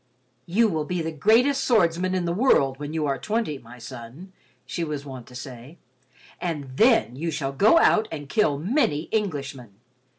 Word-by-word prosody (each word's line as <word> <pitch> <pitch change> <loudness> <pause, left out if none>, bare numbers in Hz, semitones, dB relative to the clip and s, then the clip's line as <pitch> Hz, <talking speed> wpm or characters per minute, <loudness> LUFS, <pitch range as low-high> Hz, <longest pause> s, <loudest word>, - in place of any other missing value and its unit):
"You 220 +7 +3
will 160 -6 -1
be 175 +2 -3
the 160 - -3
greatest 230 - +3
swordsman 185 -5 +2
in 180 -2 -1
the 170 - -1
world 140 - +2
when 145 0 -5
you 160 -1 -1
are 140 -2 -1
twenty, 215 -10 -2
my 120 +1 -14
son," 125 +9 -10 0.3
she 170 - -4
was 150 -3 -4
wont 130 -4 -9
to 125 - -14
say, 130 +4 -9 0.6
"and 145 -7 -4
then 225 - +4
you 165 +5 -3
shall 145 -3 -2
go 210 - +5
out 220 -8 +4
and 145 -3 -6
kill 155 -6 +1
many 185 - 0
Englishmen. 140 - -3
160 Hz, 175 wpm, -24 LUFS, 135-200 Hz, 0.6 s, go